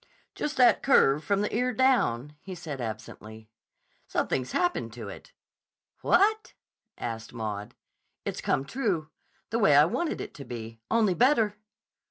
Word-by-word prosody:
"Just 300 0 -3
that 250 -1 +5
curve 150 - +4
from 200 -1 +1
the 210 - -2
ear 250 +1 +1
down," 150 - +2 0.2
said 160 -5 -6
he - - -3
absently. 110 0 -8 0.6
"Something's 130 -1 -1
happened 355 -1 0
to - - -7
it." - - -11 0.7
"What?" 425 +4 +2 0.4
asked 115 -1 -5
Maud. 105 -3 -5 0.5
"It's - - -3
come 135 - 0
true. 185 - -2 0.4
The 230 - 0
way 150 -10 +5
I 145 - +8
wanted 315 - -2
it - - -6
to 140 - -9
be. 115 -2 -8
Only 220 -4 +3
better." 225 -2 +3
160 Hz, 145 wpm, -28 LUFS, -, 0.7 s, I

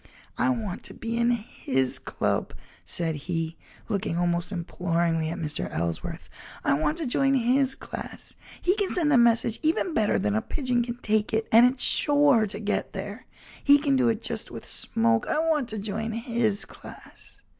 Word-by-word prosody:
"I - - +1
want 220 -8 -2
to - - -5
be 230 0 -4
in 235 0 +2
his 135 - -1
club," - - -2 0.3
said 165 -2 -2
he, 165 -2 -2 0.3
looking 200 -5 -1
almost 175 +1 0
imploringly 170 -2 -1
at 170 - -4
Mr. 150 -4 -3
Ellsworth. 85 0 -4 0.4
"I - - +3
want 155 - 0
to 325 - -2
join 275 +2 +2
his 265 +2 +2
class; - - -7 0.3
he 365 +2 +3
can 405 -3 0
send 310 -4 +2
a - - +6
message 230 -1 +3
even 320 +2 +1
better 215 -5 +2
than 105 - 0
a 110 - +1
pigeon 250 -4 -1
can 240 0 -4
take 215 0 +1
it, 220 0 0
and 240 +3 +7
it's 255 -1 -1
sure 285 -6 +4
to 205 +1 -6
get 210 -1 -2
there. 205 +5 -7 0.4
He 285 0 +7
can 285 -1 +1
do 255 -3 +3
it 225 0 -1
just 225 -2 -1
with 115 - -9
smoke. 115 0 +1
I - - 0
want 310 -5 +1
to 220 - -4
join 220 +2 -3
his 230 -3 0
class." - - -13
225 Hz, 180 wpm, -26 LUFS, 175-255 Hz, 0.4 s, and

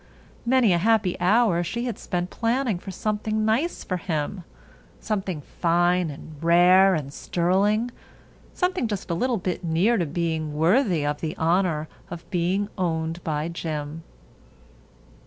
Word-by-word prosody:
Many 245 -6 +4
a 170 - +2
happy 215 -2 +2
hour 185 -1 +3
she 235 +8 -3
had 235 -5 -4
spent 175 0 -3
planning 235 -4 0
for 195 - -9
something 215 +2 -1
nice 245 +11 0
for 185 - -2
him. 170 +1 -3 0.6
Something 190 -7 -3
fine 175 +2 +1
and 150 +1 -10
rare 180 +3 +6
and 140 -3 -4
sterling—something 215 - -1
just 200 -4 -4
a - - +1
little 245 +7 0
bit 185 -1 -3
near 175 +8 +2
to 175 -5 0
being 160 -1 -2
worthy 175 - +2
of 145 0 -2
the 160 +2 -4
honor 165 -2 +1 0.2
of 170 -1 -8
being 185 +3 0
owned 165 -1 -2
by 150 0 -2
Jim. 160 -2 -5
180 Hz, 140 wpm, -24 LUFS, 165-215 Hz, 0.6 s, rare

